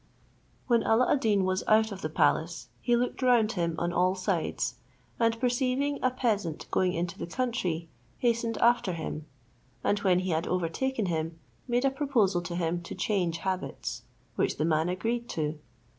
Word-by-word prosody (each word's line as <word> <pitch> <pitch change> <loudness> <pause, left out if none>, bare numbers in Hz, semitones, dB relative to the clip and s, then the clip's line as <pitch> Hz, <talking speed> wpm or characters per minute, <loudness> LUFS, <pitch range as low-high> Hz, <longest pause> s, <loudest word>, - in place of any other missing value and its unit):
When 235 -2 +3
Alla 225 +3 +3
ad 290 - +4
Deen 205 -6 +2
was 185 0 0
out 220 0 +4
of 195 -1 -6
the 155 - -2
palace, 160 +1 +1
he 240 - +3
looked 245 +2 -1
round 240 -4 +4
him 170 -5 -1
on 175 +1 -1
all 185 +2 +3
sides, 175 - -1 0.4
and 230 -1 +2
perceiving 255 +3 +1
a 255 - +3
peasant 210 - -1
going 185 -1 +2
into 170 +1 -3
the - - -4
country, 180 -7 -2 0.3
hastened 235 -1 0
after 235 -6 +3
him; 155 -2 -5 0.6
and 205 - +2
when 185 -3 +3
he 185 -1 -2
had 160 +1 0
overtaken 195 +7 -1
him, 165 -1 -2 0.3
made 245 +2 +1
a 270 - +4
proposal 240 -11 +1
to 175 0 -5
him 175 0 -1
to 170 - -7
change 185 -4 0
habits, 185 -1 -3 0.4
which - - +1
the 155 - +1
man 160 +1 +2
agreed 230 +6 -2
to. 155 -1 -2
190 Hz, 175 wpm, -29 LUFS, 170-240 Hz, 0.6 s, ad